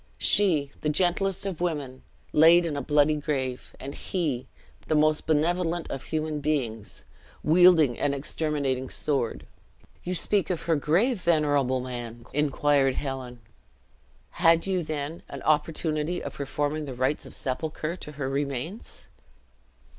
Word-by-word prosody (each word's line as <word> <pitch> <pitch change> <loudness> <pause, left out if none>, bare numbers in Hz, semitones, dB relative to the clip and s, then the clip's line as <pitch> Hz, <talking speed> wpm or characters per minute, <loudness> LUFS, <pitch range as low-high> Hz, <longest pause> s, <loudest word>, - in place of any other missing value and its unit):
She, 155 -9 +3
the 150 - 0
gentlest 185 +4 +1
of 185 -4 -4
women, 145 -7 -3 0.3
laid 165 +3 +7
in 160 -3 -2
a 140 - -2
bloody 150 +2 +3
grave; 135 -4 -3
and 140 +2 -6
he, 145 -10 -2 0.4
the 155 - +1
most 155 0 +2
benevolent 170 +2 0
of 135 - -5
human 155 -1 -2
beings, 125 -8 -2 0.4
wielding 160 -5 +5
an 145 - +1
exterminating 140 -2 -1
sword! 135 -6 -1 0.6
"You 180 +1 -2
speak 190 0 +1
of 180 -3 -2
her 165 -1 +2
grave, 185 - +1
venerable 145 -6 +2
man," 120 -2 -7
inquired 145 -2 +2
Helen; 130 -3 -5 0.9
"had 165 0 +4
you, 190 -2 0
then, 155 0 -4
an - - -7
opportunity 155 +2 0
of - - -5
performing 145 +2 -2
the 135 -3 -6
rites 130 +4 -1
of - - -9
sepulture 155 +4 -3
to 150 -4 -9
her 140 -2 -3
remains?" 140 - -4
150 Hz, 135 wpm, -27 LUFS, 135-165 Hz, 0.9 s, laid